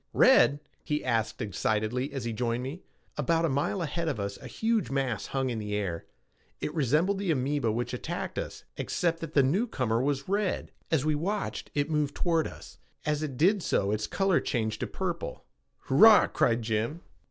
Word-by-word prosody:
"Red?" 255 Hz, -, +6 dB, 0.2 s
he 150 Hz, -1 st, -2 dB
asked 115 Hz, -2 st, 0 dB
excitedly 110 Hz, +6 st, -1 dB
as 135 Hz, -3 st, -4 dB
he 115 Hz, -, -2 dB
joined 120 Hz, +1 st, -1 dB
me. 145 Hz, +8 st, -6 dB, 0.4 s
About 165 Hz, +3 st, +2 dB
a -, -, +1 dB
mile 145 Hz, +7 st, 0 dB
ahead 165 Hz, +2 st, -2 dB
of 145 Hz, -9 st, -1 dB
us 100 Hz, 0 st, -4 dB
a -, -, -9 dB
huge 225 Hz, -1 st, 0 dB
mass 135 Hz, -6 st, -1 dB
hung 135 Hz, -2 st, -1 dB
in 115 Hz, -, -3 dB
the 105 Hz, -1 st, -3 dB
air. 95 Hz, -5 st, -3 dB, 0.5 s
It 150 Hz, -, -3 dB
resembled 160 Hz, -, +2 dB
the 200 Hz, -2 st, -2 dB
amoeba 135 Hz, -4 st, +1 dB
which 120 Hz, +3 st, -2 dB
had -, -, -4 dB
attacked -, -, -4 dB
us, -, -, -6 dB
except 170 Hz, -1 st, 0 dB
that 165 Hz, -2 st, -7 dB
the 140 Hz, -, +6 dB
newcomer 130 Hz, -, +1 dB
was 140 Hz, 0 st, -1 dB
red. 200 Hz, 0 st, -1 dB, 0.2 s
As 155 Hz, -3 st, +1 dB
we 155 Hz, -, +2 dB
watched, 195 Hz, +8 st, -2 dB
it 145 Hz, +2 st, 0 dB
moved 150 Hz, -2 st, 0 dB
toward 165 Hz, -3 st, +1 dB
us. -, -, -12 dB, 0.3 s
As 150 Hz, 0 st, 0 dB
it 140 Hz, -5 st, -4 dB
did 190 Hz, -, +4 dB
so 100 Hz, -10 st, +1 dB
its 105 Hz, 0 st, -1 dB
color 195 Hz, -2 st, +2 dB
changed 110 Hz, -4 st, -2 dB
to -, -, -2 dB
purple. -, -, -4 dB, 0.4 s
"Hurrah!" 215 Hz, +10 st, +7 dB
cried 115 Hz, 0 st, +1 dB
Jim. 115 Hz, +9 st, -1 dB
140 Hz, 185 wpm, -29 LUFS, 115-165 Hz, 0.5 s, Hurrah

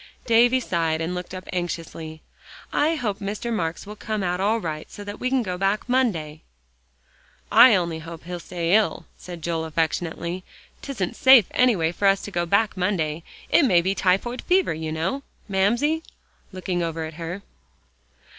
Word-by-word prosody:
Davie 240 Hz, +2 st, +5 dB
sighed, 165 Hz, -8 st, -1 dB
and 165 Hz, +2 st, -2 dB
looked 180 Hz, -1 st, -6 dB
up 185 Hz, 0 st, -8 dB
anxiously. 165 Hz, -3 st, -5 dB, 0.5 s
"I 310 Hz, +3 st, +2 dB
hope 215 Hz, -8 st, -2 dB
Mr. 210 Hz, +4 st, -3 dB
Marks 165 Hz, -5 st, -2 dB
will 210 Hz, +1 st, -8 dB
come 215 Hz, -1 st, -3 dB
out 180 Hz, 0 st, -1 dB
all 215 Hz, +4 st, +2 dB
right 155 Hz, -5 st, -5 dB
so 205 Hz, -, -9 dB
that 205 Hz, 0 st, -7 dB
we 255 Hz, -, -1 dB
can 260 Hz, -2 st, +1 dB
go 180 Hz, -3 st, -4 dB
back 195 Hz, +4 st, 0 dB
Monday." 175 Hz, -13 st, 0 dB, 1.1 s
"I 250 Hz, -4 st, +8 dB
only 170 Hz, -3 st, -1 dB
hope 165 Hz, 0 st, -9 dB
he'll 175 Hz, +1 st, -6 dB
stay 170 Hz, 0 st, -2 dB
ill," 215 Hz, 0 st, +2 dB
said 175 Hz, -3 st, -10 dB
Joel 165 Hz, -1 st, -1 dB
affectionately. 165 Hz, +2 st, -2 dB, 0.4 s
"'Tisn't 200 Hz, -11 st, -3 dB
safe 260 Hz, -6 st, +7 dB
anyway 205 Hz, -11 st, +3 dB
for 200 Hz, +3 st, 0 dB
us 195 Hz, 0 st, +3 dB
to 205 Hz, -, -6 dB
go 175 Hz, -2 st, -1 dB
back 200 Hz, +4 st, +2 dB
Monday. 170 Hz, -4 st, -1 dB, 0.3 s
It -, -, +6 dB
may 185 Hz, -10 st, +5 dB
be 190 Hz, +3 st, 0 dB
typhoid 195 Hz, +6 st, 0 dB
fever, 370 Hz, -, +2 dB
you 160 Hz, 0 st, -4 dB
know, 170 Hz, -, -2 dB, 0.3 s
Mamsie," 235 Hz, +11 st, +1 dB, 0.5 s
looking 185 Hz, -1 st, -3 dB
over 165 Hz, -1 st, -2 dB
at 160 Hz, -, -8 dB
her. 175 Hz, +4 st, -5 dB
185 Hz, 170 wpm, -24 LUFS, 165-215 Hz, 1.1 s, I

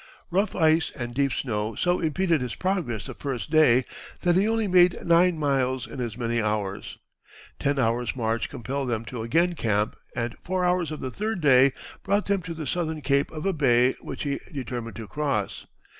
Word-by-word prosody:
Rough 195 Hz, +3 st, +1 dB
ice 160 Hz, -1 st, +3 dB
and 120 Hz, -3 st, -5 dB
deep 140 Hz, +1 st, +1 dB
snow 110 Hz, -3 st, -2 dB
so 180 Hz, -, +1 dB
impeded 165 Hz, -1 st, +1 dB
his 125 Hz, -3 st, -3 dB
progress 175 Hz, -, -2 dB
the -, -, -6 dB
first 135 Hz, -2 st, -5 dB
day 130 Hz, -6 st, +5 dB, 0.4 s
that 175 Hz, -1 st, +3 dB
he 195 Hz, +3 st, +3 dB
only 225 Hz, -1 st, +1 dB
made 180 Hz, -1 st, +4 dB
nine 170 Hz, 0 st, +4 dB
miles 130 Hz, -4 st, 0 dB
in 130 Hz, -, -7 dB
as 115 Hz, -2 st, -4 dB
many 120 Hz, -1 st, 0 dB
hours. 105 Hz, -2 st, -3 dB, 0.6 s
Ten 140 Hz, 0 st, 0 dB
hours' 120 Hz, -1 st, 0 dB
march 115 Hz, -2 st, -1 dB
compelled 135 Hz, +1 st, -4 dB
them 115 Hz, -1 st, -2 dB
to 115 Hz, 0 st, -6 dB
again 165 Hz, +10 st, +2 dB
camp, 105 Hz, -8 st, 0 dB, 0.2 s
and 120 Hz, -1 st, -2 dB
four 185 Hz, 0 st, -1 dB
hours 180 Hz, -2 st, +1 dB
of 155 Hz, -, -6 dB
the 130 Hz, -, -4 dB
third 215 Hz, +3 st, -2 dB
day 135 Hz, -3 st, +6 dB, 0.3 s
brought 200 Hz, +1 st, +1 dB
them 200 Hz, -1 st, +1 dB
to 165 Hz, -1 st, -6 dB
the 160 Hz, -1 st, -5 dB
southern 160 Hz, +1 st, -2 dB
cape 140 Hz, 0 st, +1 dB
of 155 Hz, +1 st, -7 dB
a 195 Hz, -, +2 dB
bay 125 Hz, -4 st, +3 dB
which 135 Hz, -, -6 dB
he 140 Hz, -2 st, -2 dB
determined 125 Hz, -5 st, -5 dB
to 115 Hz, -2 st, -7 dB
cross. 140 Hz, -9 st, -2 dB
140 Hz, 190 wpm, -26 LUFS, 120-170 Hz, 0.6 s, day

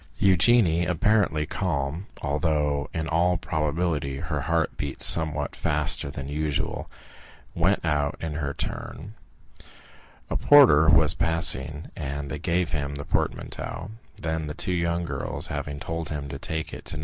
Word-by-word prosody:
Eugénie, 95 Hz, -3 st, +4 dB
apparently 90 Hz, -4 st, +2 dB
calm, 80 Hz, +1 st, -2 dB, 0.2 s
although 75 Hz, -1 st, 0 dB
in 80 Hz, -1 st, -3 dB
all 85 Hz, +2 st, +2 dB
probability 75 Hz, -2 st, -1 dB
her -, -, -3 dB
heart 85 Hz, -1 st, 0 dB
beat 70 Hz, -2 st, -5 dB
somewhat 75 Hz, -3 st, +3 dB
faster 75 Hz, -1 st, +2 dB
than 70 Hz, -1 st, -6 dB
usual, 75 Hz, 0 st, -2 dB, 0.6 s
went 85 Hz, +2 st, +1 dB
out 75 Hz, -2 st, 0 dB
in 80 Hz, -2 st, -4 dB
her 75 Hz, -2 st, -2 dB
turn. 80 Hz, +6 st, -6 dB, 1.1 s
A -, -, -3 dB
porter 120 Hz, -, +6 dB
was 80 Hz, -1 st, +5 dB
passing 80 Hz, -2 st, +1 dB
and 70 Hz, -2 st, -5 dB
they 75 Hz, -, -4 dB
gave 85 Hz, +1 st, 0 dB
him 70 Hz, -1 st, -2 dB
the 70 Hz, 0 st, -6 dB
portmanteau; 105 Hz, -, -3 dB, 0.3 s
then 80 Hz, -1 st, -3 dB
the 75 Hz, -, -6 dB
two 90 Hz, +1 st, -1 dB
young 85 Hz, 0 st, 0 dB
girls, -, -, -4 dB
having 70 Hz, 0 st, -4 dB
told 80 Hz, 0 st, -4 dB
him 75 Hz, -2 st, -4 dB
to 70 Hz, 0 st, -6 dB
take 80 Hz, 0 st, -4 dB
it -, -, -9 dB
to 80 Hz, -, -5 dB
No. -, -, -5 dB
80 Hz, 150 wpm, -25 LUFS, 75-85 Hz, 1.1 s, porter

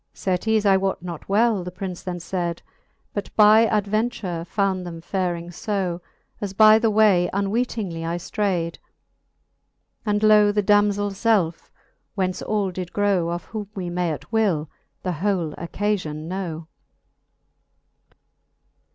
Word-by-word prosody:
Certes 210 Hz, +3 st, 0 dB
I 195 Hz, -1 st, +5 dB
wote 190 Hz, -2 st, -2 dB
not 175 Hz, -1 st, -7 dB
well, 215 Hz, -1 st, +3 dB
the 180 Hz, -, -5 dB
Prince 185 Hz, 0 st, -6 dB
then 180 Hz, -1 st, -4 dB
fayd, 175 Hz, -1 st, -3 dB, 0.5 s
But 205 Hz, -, -4 dB
by 215 Hz, +1 st, +7 dB
adventure 210 Hz, -4 st, -1 dB
found 190 Hz, 0 st, 0 dB
them 170 Hz, -2 st, -7 dB
faring 175 Hz, -1 st, -2 dB
fb. 180 Hz, -1 st, -3 dB, 0.4 s
As 200 Hz, -2 st, -3 dB
by 215 Hz, +2 st, +7 dB
the 225 Hz, 0 st, +2 dB
way 205 Hz, -5 st, +4 dB
unweetingly 200 Hz, -3 st, -1 dB
I 165 Hz, +1 st, -2 dB
ftrayd: 175 Hz, -3 st, -2 dB, 1.3 s
And 210 Hz, -1 st, 0 dB
lo 210 Hz, -1 st, +6 dB
the 210 Hz, 0 st, 0 dB
damzell 205 Hz, 0 st, +3 dB
felfe, 195 Hz, -5 st, 0 dB, 0.5 s
whence 185 Hz, -2 st, -1 dB
all 205 Hz, -3 st, -1 dB
did 180 Hz, -1 st, -6 dB
grow, 200 Hz, -5 st, +1 dB
Of 175 Hz, 0 st, -3 dB
whom 210 Hz, -3 st, -6 dB
we 180 Hz, -3 st, -4 dB
may 175 Hz, -1 st, 0 dB
at 155 Hz, -, -7 dB
will 190 Hz, -10 st, +1 dB, 0.3 s
the 185 Hz, -, -1 dB
whole 175 Hz, -1 st, -1 dB
occafion 170 Hz, -3 st, -3 dB
know. 170 Hz, -3 st, -4 dB
195 Hz, 135 wpm, -23 LUFS, 175-210 Hz, 1.3 s, by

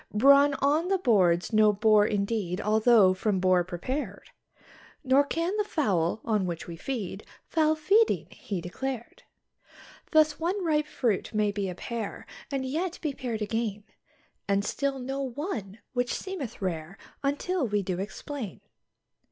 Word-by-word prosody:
Brawn 280 Hz, +5 st, +6 dB
on 295 Hz, +5 st, +1 dB
the 390 Hz, 0 st, +2 dB
board's 190 Hz, -, +2 dB
no 215 Hz, 0 st, +6 dB
bore 210 Hz, 0 st, +4 dB
indeed 200 Hz, -3 st, -1 dB
although 215 Hz, -2 st, +5 dB
from 190 Hz, +1 st, 0 dB
boar 185 Hz, -1 st, +3 dB
prepared; 200 Hz, -, -5 dB, 0.7 s
Nor 270 Hz, +1 st, +5 dB
can 335 Hz, +6 st, -2 dB
the 420 Hz, -, +2 dB
fowl, 210 Hz, -, 0 dB
on 210 Hz, -5 st, +1 dB
which 170 Hz, -2 st, -4 dB
we 170 Hz, -, -7 dB
feed, 205 Hz, -1 st, -5 dB, 0.2 s
foul 315 Hz, -1 st, +2 dB
feeding 400 Hz, +9 st, +3 dB
he 195 Hz, -4 st, -5 dB
declared. 240 Hz, +7 st, -5 dB, 0.9 s
Thus, 310 Hz, -2 st, +4 dB
one 360 Hz, +3 st, -1 dB
ripe 300 Hz, -2 st, +1 dB
fruit 225 Hz, -7 st, -1 dB
may 210 Hz, -1 st, +2 dB
be 200 Hz, -2 st, -2 dB
a 180 Hz, -, -5 dB
pear, 230 Hz, +1 st, -5 dB, 0.3 s
and 270 Hz, -1 st, -1 dB
yet 330 Hz, +7 st, -2 dB
be 300 Hz, -3 st, -1 dB
pared 235 Hz, -5 st, -3 dB
again, 215 Hz, -1 st, -2 dB, 0.6 s
And 200 Hz, 0 st, +1 dB
still 280 Hz, -1 st, -1 dB
no 265 Hz, +2 st, -4 dB
one, 245 Hz, -, -4 dB, 0.2 s
which 245 Hz, -1 st, 0 dB
seemeth 330 Hz, -, -6 dB
rare 170 Hz, 0 st, -3 dB, 0.2 s
until 290 Hz, +2 st, 0 dB
we 205 Hz, -1 st, 0 dB
do 180 Hz, -1 st, -3 dB
explain. 215 Hz, -, -6 dB
230 Hz, 145 wpm, -28 LUFS, 200-285 Hz, 0.9 s, Brawn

